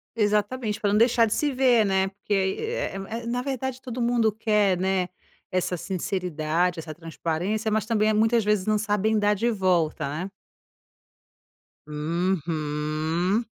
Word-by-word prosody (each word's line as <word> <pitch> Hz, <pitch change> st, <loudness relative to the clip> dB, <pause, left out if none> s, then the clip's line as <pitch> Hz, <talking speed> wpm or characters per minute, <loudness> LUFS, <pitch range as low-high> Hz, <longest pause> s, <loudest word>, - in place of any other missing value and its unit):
Exatamente, 210 Hz, +1 st, 0 dB
para 205 Hz, -1 st, +1 dB
não 210 Hz, -, +3 dB
deixar 230 Hz, 0 st, +5 dB
de 215 Hz, -, -1 dB
se 295 Hz, -1 st, 0 dB
ver, 250 Hz, -3 st, +4 dB
né, 190 Hz, -1 st, +2 dB
porque 200 Hz, +1 st, -5 dB
aí, 190 Hz, -1 st, +1 dB
eh 455 Hz, +2 st, -2 dB, 0.3 s
eh, -, -, -9 dB
na 245 Hz, +1 st, -1 dB
verdade 265 Hz, -1 st, -3 dB
todo 250 Hz, -2 st, -6 dB
mundo 235 Hz, -2 st, +2 dB
quer, 210 Hz, -3 st, +2 dB
né, 190 Hz, 0 st, 0 dB, 0.4 s
essa 185 Hz, 0 st, 0 dB
sinceridade, 175 Hz, -1 st, -1 dB
essa 155 Hz, -1 st, -7 dB
transparência, 170 Hz, +6 st, -2 dB
mas 215 Hz, -1 st, +1 dB
também 215 Hz, -1 st, +2 dB
muitas 225 Hz, +2 st, +3 dB
vezes 210 Hz, -2 st, +1 dB
não 215 Hz, 0 st, +3 dB
sabem 210 Hz, +1 st, +1 dB
dar 205 Hz, 0 st, +3 dB
de 230 Hz, +4 st, 0 dB
volta, 180 Hz, -8 st, +1 dB
né? 175 Hz, +7 st, -4 dB, 1.6 s
Uhum. 160 Hz, -, -1 dB
205 Hz, 145 wpm, -25 LUFS, 175-220 Hz, 1.6 s, deixar